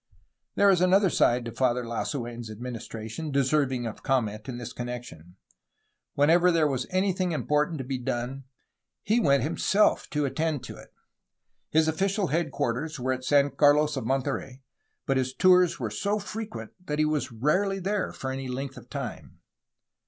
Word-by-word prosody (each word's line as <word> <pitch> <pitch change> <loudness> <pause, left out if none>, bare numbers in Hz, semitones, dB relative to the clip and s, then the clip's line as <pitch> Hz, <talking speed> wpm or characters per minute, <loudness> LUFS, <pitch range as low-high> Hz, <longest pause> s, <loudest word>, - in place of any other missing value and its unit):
There 200 0 +5
is 180 -2 +2
another 185 0 +4
side 120 0 +2
to 115 - -5
Father 125 +1 +1
Lasu6n's 120 -1 -4
administration 115 +4 -6
deserving 135 -2 +1
of 110 - -6
comment 110 -4 -1
in 120 - -5
this 120 -1 -7
con 120 - -5
nection. 100 -9 -8 0.8
Whenever 170 +5 +5
there 165 -3 +3
was 130 -3 -2
anything 185 -1 0
important 150 +1 0
to 135 - -4
be 130 0 -3
done, 125 +2 -3 0.6
he 220 +4 +2
went 140 - +3
himself 195 +7 +2
to 150 -1 0
attend 155 0 -1
to - - -8
it. - - -14 0.8
His 160 0 +3
official 190 +3 0
head 160 +1 0
quarters 140 +4 -2
were 130 +1 0
at 130 0 -6
San 140 +1 +3
Carlos 150 +1 +4
of 110 - -3
Monterey, 135 0 -2 0.4
but 135 - +1
his 130 0 -1
tours 180 -3 +4
were 115 -5 -3
so 200 - -1
frequent 215 +1 -6
that 150 -4 -3
he 155 - +3
was 150 -4 -1
rarely 170 - +1
there 195 +1 -1
for 130 - -5
any 135 0 -4
length 135 +2 -5
of - - -13
time. - - -6
140 Hz, 165 wpm, -27 LUFS, 125-165 Hz, 0.8 s, There